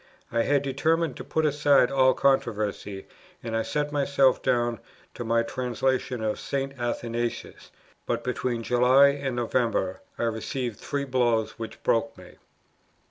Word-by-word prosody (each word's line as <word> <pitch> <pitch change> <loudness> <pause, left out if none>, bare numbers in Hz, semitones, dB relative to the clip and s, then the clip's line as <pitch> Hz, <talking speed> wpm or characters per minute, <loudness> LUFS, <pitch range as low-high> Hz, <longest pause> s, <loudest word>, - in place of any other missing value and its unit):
I 115 - +1
had 140 +3 +2
determined 160 +5 0
to - - -7
put 160 0 -1
aside 145 -3 +4
all 130 -1 +4
controversy, 105 -7 0 0.4
and 115 -1 -3
I 115 - +1
set 150 +5 -2
myself 140 -2 +2
down 120 -2 +1 0.3
to - - -6
my 115 0 +2
translation 125 0 -2
of 110 -1 -1
St. 135 0 -3
Athanasius; 120 0 -3 0.4
but, - - -1
between 125 -2 -2
July 125 +4 +5
and 140 -2 -3
November, 115 -5 0 0.2
I - - -2
received 115 0 -3
three 140 -1 -3
blows 120 -4 0
which 115 - -8
broke 115 0 +1
me. - - -14
125 Hz, 140 wpm, -26 LUFS, 115-135 Hz, 0.4 s, July